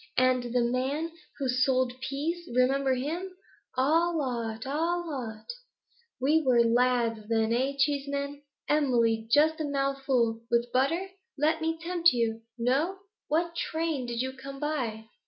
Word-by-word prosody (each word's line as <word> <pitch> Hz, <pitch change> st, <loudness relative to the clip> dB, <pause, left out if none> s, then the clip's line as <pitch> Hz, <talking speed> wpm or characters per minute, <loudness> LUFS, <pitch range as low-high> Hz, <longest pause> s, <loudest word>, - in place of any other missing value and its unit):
And 255 Hz, 0 st, +4 dB
the 240 Hz, 0 st, +1 dB
man 265 Hz, +7 st, -1 dB, 0.3 s
who 275 Hz, -, -1 dB
sold 255 Hz, 0 st, +2 dB
peas; 330 Hz, +6 st, -3 dB
remember 265 Hz, +1 st, +3 dB
him? 345 Hz, +8 st, -4 dB, 0.4 s
"All 325 Hz, +5 st, +3 dB
'ot! 235 Hz, -4 st, -3 dB
All 335 Hz, +5 st, -1 dB
'ot!" 220 Hz, -5 st, -6 dB, 0.7 s
We 300 Hz, +5 st, +3 dB
were 250 Hz, -5 st, +4 dB
lads 230 Hz, -2 st, +1 dB
then, 225 Hz, 0 st, +2 dB
eh, 260 Hz, +3 st, +1 dB
Cheeseman? 280 Hz, 0 st, -1 dB, 0.3 s
Emily, 235 Hz, -7 st, +2 dB
just 310 Hz, +5 st, +4 dB
a -, -, -1 dB
mouthful, 275 Hz, -5 st, 0 dB
with 235 Hz, 0 st, +1 dB
butter? 330 Hz, +9 st, +1 dB, 0.3 s
Let 315 Hz, +3 st, +2 dB
me 325 Hz, 0 st, 0 dB
tempt 345 Hz, -1 st, +3 dB
you. 230 Hz, -2 st, 0 dB, 0.2 s
No? 275 Hz, +11 st, +1 dB, 0.3 s
What 335 Hz, +2 st, 0 dB
train 320 Hz, -6 st, -2 dB
did 235 Hz, +1 st, -1 dB
you 260 Hz, 0 st, -4 dB
come 275 Hz, +1 st, -9 dB
by?' 250 Hz, -8 st, -2 dB
270 Hz, 140 wpm, -28 LUFS, 245-310 Hz, 0.7 s, And